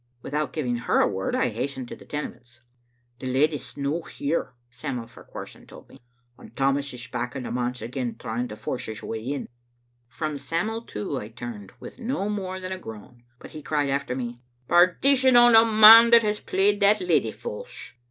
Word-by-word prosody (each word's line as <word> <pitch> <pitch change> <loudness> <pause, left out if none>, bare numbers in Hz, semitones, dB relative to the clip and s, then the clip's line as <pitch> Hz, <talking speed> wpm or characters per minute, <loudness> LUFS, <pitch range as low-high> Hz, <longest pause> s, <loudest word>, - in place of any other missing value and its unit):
Without 150 -1 -2
giving 125 -6 -2
her 120 - +1
a - - +4
word 95 0 -2
I - - +1
hastened 130 +3 -4
to - - -7
the - - -16
Tene 150 0 -4
ments. 120 0 -20 0.6
"The 130 - -6
leddy's 135 -1 0
no 145 +4 -1
here," 145 -4 -3 0.2
Sam'l 125 -1 -5
Parquharson 115 - -11
told - - -14
me, - - -16 0.4
and - - -15
Tammas 140 +1 0
is 125 -1 -8
back 125 +1 -5
at 130 - -4
the - - -6
manse 125 -1 -3
again, 120 0 -4
trying 120 +1 -3
to 105 - -8
force 125 - -5
his 110 +1 -7
way 110 - -4
in." 135 +5 -4 0.6
From 150 +3 -4
Sam'l, 220 +10 -3
too, 105 - -4
I 105 - -8
turned, 115 -4 -9
with - - -11
no 240 -4 -2
more 190 -3 -4
than 185 0 -6
a 185 - -4
groan; 120 - -12
but - - -13
he 155 - -9
cried 145 -2 -1
after 140 -2 -2
me, 120 -1 -5
" 120 +1 -41
Perdition 255 +10 +4
on 240 0 +7
the 225 0 +9
man 225 +1 +9
that 235 0 +7
has 210 0 -1
played 200 +2 +1
that 205 +1 +4
leddy 170 - +1
false." 105 - -8
140 Hz, 200 wpm, -25 LUFS, 120-185 Hz, 0.6 s, the